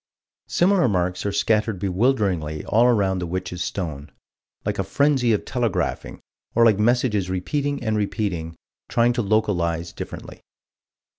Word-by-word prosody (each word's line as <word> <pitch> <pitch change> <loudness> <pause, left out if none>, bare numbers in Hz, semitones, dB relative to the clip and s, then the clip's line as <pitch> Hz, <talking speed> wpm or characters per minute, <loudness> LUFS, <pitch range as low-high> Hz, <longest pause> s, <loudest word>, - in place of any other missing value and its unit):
Similar 185 -3 +3
marks 90 -2 -1
are - - 0
scattered 110 0 +1
bewilderingly 95 - 0
all 115 +3 +3
around 100 -6 +2
the 90 - -3
Witch's 90 0 -3
Stone 80 -7 -5 0.5
like 105 0 -2
a - - +2
frenzy 130 +3 +2
of 105 - 0
telegraphing, 120 -6 -2 0.3
or 115 0 +5
like 105 -3 +4
messages 110 -4 +2
repeating 140 +10 -2
and 110 -2 0
repeating, 100 -6 -2 0.3
trying 120 +1 +3
to 120 - 0
localize 85 -6 0
differently. - - -8
105 Hz, 135 wpm, -23 LUFS, 90-120 Hz, 0.5 s, or